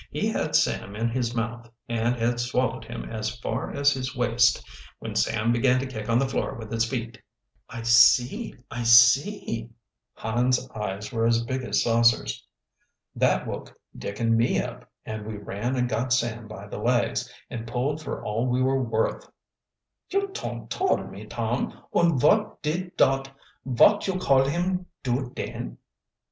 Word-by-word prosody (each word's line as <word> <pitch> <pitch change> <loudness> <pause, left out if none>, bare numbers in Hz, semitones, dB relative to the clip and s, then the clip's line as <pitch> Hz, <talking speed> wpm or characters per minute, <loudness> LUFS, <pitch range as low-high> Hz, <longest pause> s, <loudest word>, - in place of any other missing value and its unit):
He - - -2
had - - -1
Sam 100 - +1
in 115 +2 0
his 120 0 -2
mouth, 115 +1 -3 0.2
and 115 +1 0
had 120 +1 0
swallowed 125 0 -1
him 115 +1 -6
as 110 +1 -4
far 115 0 -3
as 140 0 +2
his 130 -1 -3
waist, 120 -1 +2 0.3
when - - -6
Sam 115 +1 +1
began 125 +2 +3
to 135 - -2
kick 115 -5 -6
on 115 - +4
the 135 +2 +2
floor 130 - -2
with 110 -2 -9
his 115 0 +1
feet." 120 -1 -5 0.5
"I 115 - -7
see, 120 - +5 0.2
I 120 - -4
see 120 - +4 0.2
" - - -60
Hans' 125 +3 0
eyes 105 +1 -5
were 115 0 +2
as 115 0 +2
big 130 +2 -3
as 125 - 0
saucers. 115 - +2 0.7
"That - - +2
woke - - -7 0.2
Dick 100 - -6
and 115 -1 +2
me 115 +1 +2
up, - - -6 0.2
and 110 -1 -5
we 105 0 -6
ran 105 +5 -3
and 125 -1 +1
got 120 +2 -2
Sam 120 -2 0
by 110 - -9
the - - -7
legs, - - 0 0.2
and 115 -1 -5
pulled 135 +6 -1
for - - -6
all 115 +4 -1
we 125 0 +1
were 130 +1 +2
worth." 115 -2 -1 0.8
"You 395 +1 0
ton't 390 - -6
tole 380 0 +2
me, - - -10
Tom! - - -2
Und 170 -5 +3
vot 210 - +3
did 175 +4 -3
dot 135 0 +3 0.3
vot 135 - +4
you 190 -1 0
call 135 -7 +3
him 180 +4 -1 0.2
do 125 0 -1
den?" - - -5
120 Hz, 170 wpm, -26 LUFS, 115-130 Hz, 0.8 s, see